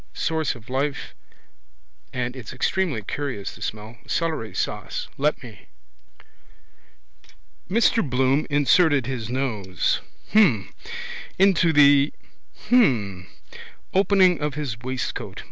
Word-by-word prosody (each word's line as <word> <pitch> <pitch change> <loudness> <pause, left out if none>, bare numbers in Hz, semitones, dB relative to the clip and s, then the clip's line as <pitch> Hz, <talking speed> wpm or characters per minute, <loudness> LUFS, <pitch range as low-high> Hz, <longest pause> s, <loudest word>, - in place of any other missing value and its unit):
Source 160 -3 -1
of 115 -2 -14
life. 135 +2 -2 1.0
And 125 0 -3
it's 120 -4 -8
extremely 140 - -1
curious 125 -4 -4
the - - -15
smell. 110 +2 -6
Celery 155 - -2
sauce. - - -3
Let 145 0 0
me. 110 -5 -13 2.0
Mr 230 +3 +3
Bloom 130 +3 +2
inserted 145 - +3
his 120 -4 -4
nose. 110 -8 -1 0.3
Hm. 140 - +3 0.6
Into 185 -3 +4
the. 145 -1 +5 0.6
Hm. 105 - +2 0.7
Opening 190 -3 +4
of 150 -2 -2
his 145 -7 -3
waistcoat. 130 +1 -4
135 Hz, 100 wpm, -23 LUFS, 115-160 Hz, 2.0 s, the